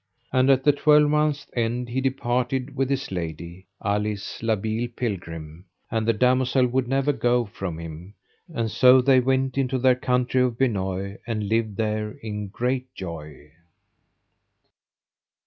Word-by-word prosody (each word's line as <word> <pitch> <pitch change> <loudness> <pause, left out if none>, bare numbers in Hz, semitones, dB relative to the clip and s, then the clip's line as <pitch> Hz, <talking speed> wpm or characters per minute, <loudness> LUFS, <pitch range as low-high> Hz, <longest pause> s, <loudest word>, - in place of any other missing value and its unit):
And 130 0 +3
at 135 -1 +4
the 145 - +5
twelvemonth's 150 0 +3
end 120 +1 -1
he 130 +2 -1
departed 130 0 -1
with 135 -1 0
his 135 -4 -2
lady, 85 +1 -6 0.2
Alice 105 0 -2
la 115 -1 +2
Beale 110 +3 -2
Pilgrim. 85 -8 -5 0.3
And 110 -1 -1
the - - +5
damosel 125 +2 +3
would 125 0 0
never 135 +2 +1
go 120 -2 +1
from 95 -5 -6
him, 85 +4 -9 0.4
and 115 -7 -2
so 130 +3 +6
they 130 0 +5
went 130 +1 0
into 130 -1 0
their 130 0 +4
country 125 0 +1
of 125 -2 0
Benoye, 100 -5 -1
and 110 -3 -2
lived 110 -2 0
there 105 0 -1
in 105 -2 -4
great 125 +5 -2
joy. 75 -5 -8
120 Hz, 145 wpm, -24 LUFS, 100-130 Hz, 0.4 s, so